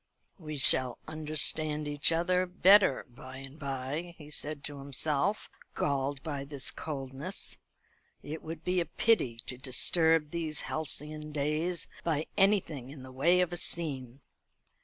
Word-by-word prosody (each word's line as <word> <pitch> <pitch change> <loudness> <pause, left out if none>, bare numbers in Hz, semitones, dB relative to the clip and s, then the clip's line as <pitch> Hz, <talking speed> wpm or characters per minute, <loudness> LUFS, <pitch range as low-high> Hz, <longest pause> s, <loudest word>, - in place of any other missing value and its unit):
"We 155 -3 -7
shall 130 -2 +7
understand 155 -1 +1
each 145 +2 0
other 180 +2 +1
better 185 -3 +5
by 130 +1 -12
and 135 +3 -10
by," 140 +5 -5
he 150 -1 -13
said 150 -1 0
to 145 -1 -6
himself, 140 +7 0 0.3
galled 140 -1 -1
by 145 -3 -4
this 140 -1 -3
coldness. 140 +4 -5 0.7
"It 155 +2 -6
would 160 0 -8
be 180 0 0
a 170 - 0
pity 130 - +1
to 125 - 0
disturb 155 +4 +2
these 160 -3 -2
halcyon 150 0 -4
days 155 +4 -1 0.2
by 160 -2 -1
anything 170 -10 +1
in 135 -2 -10
the 130 - -11
way 170 +8 +3
of 180 -1 -1
a - - -2
scene. 140 -7 -2
150 Hz, 140 wpm, -30 LUFS, 135-165 Hz, 0.7 s, shall